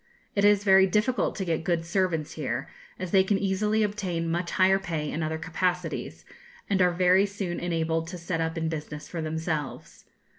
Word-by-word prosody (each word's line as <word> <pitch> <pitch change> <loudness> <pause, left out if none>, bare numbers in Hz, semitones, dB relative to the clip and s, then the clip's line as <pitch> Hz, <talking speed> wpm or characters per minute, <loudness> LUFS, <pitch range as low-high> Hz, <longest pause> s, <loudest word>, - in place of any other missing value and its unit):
It 200 - +1
is 205 -1 +5
very 190 -1 +6
difficult 215 +6 +1
to 195 - -3
get 165 -2 -1
good 165 -1 0
servants 170 -3 0
here, 135 -2 -3 0.3
as 185 -2 -5
they 190 -1 +5
can 195 +1 +1
easily 210 +3 +1
obtain 185 -6 -2
much 175 +1 -1
higher 190 0 +4
pay 160 -5 -3
in 160 - -3
other 160 0 -1
capacities, 170 +1 -2 0.4
and 195 -2 +1
are 180 - +5
very 180 +3 +4
soon 195 -3 -4
enabled 165 -1 -1
to 180 +1 -6
set 170 -1 -3
up 160 +1 -2
in 160 0 -1
business 150 -1 -5
for 170 - -5
themselves. 160 -1 -4
175 Hz, 185 wpm, -27 LUFS, 160-190 Hz, 0.4 s, very